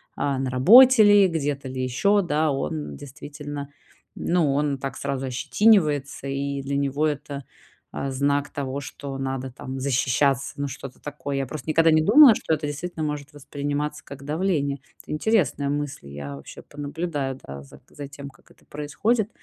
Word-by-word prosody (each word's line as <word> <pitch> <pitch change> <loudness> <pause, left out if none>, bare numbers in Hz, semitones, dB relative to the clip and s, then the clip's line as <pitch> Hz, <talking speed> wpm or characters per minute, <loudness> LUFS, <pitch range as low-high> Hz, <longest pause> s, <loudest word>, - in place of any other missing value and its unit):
а, 140 -2 -1
на 130 -1 -1
работе 230 - +8
ли, 205 -1 +6
где-то 145 -5 -2
ли 130 0 -4
ещё, 200 +12 +2
да- 155 -3 +1
он 75 - -3
действительно 145 - -8 0.5
ну, 165 -5 +1
он 145 0 0
так 135 0 -5
сразу 135 -1 -3
ощетинивается, 145 - +2
и 140 0 -2
для 140 +1 -2
него 140 +2 0
это, 145 -2 -3 0.5
а, 135 - -4
знак 140 +2 0
того, 140 -1 -4
что 140 0 -7
надо 135 -1 -4
там 130 +2 -7
защищаться, 135 0 +1
ну, 140 0 -2
что-то 130 0 -9
такое. 145 -1 -5
Я 135 0 -1
просто 150 +3 -7
никогда 165 +1 +4
не 155 0 +4
думала, 240 - +8
что 160 - -2
это 155 -1 -1
действительно 155 +3 -4
может 150 -1 -4
восприниматься 145 +1 -4
как 140 0 -10
давление. 150 -2 -1 0.3
Это - - -10
интересная 155 - +1
мысль. 145 - -3
Я 70 0 -7
вообще 70 - -11
понаблюдаю, 145 -2 -4
да, 70 0 -8
за 70 - -16
к - - -32
за 145 -1 -7
тем, 140 0 -9
как - - -23
это - - -24
происходит. 200 +10 -1
145 Hz, 170 wpm, -24 LUFS, 135-155 Hz, 0.5 s, работе